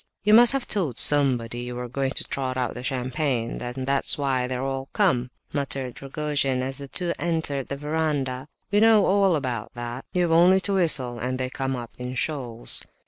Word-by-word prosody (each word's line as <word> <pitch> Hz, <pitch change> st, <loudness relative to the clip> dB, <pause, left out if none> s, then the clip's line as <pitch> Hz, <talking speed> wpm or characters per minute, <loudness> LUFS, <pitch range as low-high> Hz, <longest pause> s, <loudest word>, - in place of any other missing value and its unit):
"You 210 Hz, +1 st, +4 dB
must 240 Hz, +2 st, +8 dB
have 270 Hz, -2 st, -1 dB
told 165 Hz, -, -1 dB
somebody 125 Hz, -5 st, +4 dB
you 125 Hz, 0 st, -5 dB
were 125 Hz, 0 st, -4 dB
going 135 Hz, +2 st, -1 dB
to -, -, 0 dB
trot 130 Hz, -1 st, -3 dB
out 125 Hz, -2 st, -1 dB
the 125 Hz, -, -7 dB
champagne, 130 Hz, -1 st, -2 dB
and 125 Hz, +2 st, -4 dB
that's 135 Hz, 0 st, +1 dB
why 130 Hz, -3 st, 0 dB
they 130 Hz, -, -3 dB
are 125 Hz, -, -3 dB
all 135 Hz, 0 st, -3 dB
come!" 165 Hz, -, +2 dB, 0.2 s
muttered 135 Hz, -3 st, -3 dB
Rogojin, 140 Hz, -2 st, -1 dB
as 135 Hz, +1 st, -2 dB
the 140 Hz, -, -7 dB
two 175 Hz, +4 st, -1 dB
entered 160 Hz, -5 st, -1 dB
the 140 Hz, -, -4 dB
verandah. 145 Hz, -3 st, -2 dB, 0.2 s
"We 205 Hz, -, +4 dB
know 220 Hz, -2 st, +5 dB
all 195 Hz, -2 st, +3 dB
about 125 Hz, -5 st, -4 dB
that! 120 Hz, +2 st, -6 dB
You've 175 Hz, -2 st, +1 dB
only 175 Hz, +3 st, +6 dB
to 200 Hz, -, 0 dB
whistle 135 Hz, -10 st, +1 dB
and 125 Hz, +2 st, -2 dB
they 130 Hz, 0 st, -3 dB
come 135 Hz, 0 st, -2 dB
up 120 Hz, -2 st, -7 dB
in 125 Hz, +1 st, -5 dB
shoals!" 125 Hz, -5 st, -2 dB
135 Hz, 195 wpm, -25 LUFS, 125-160 Hz, 0.2 s, must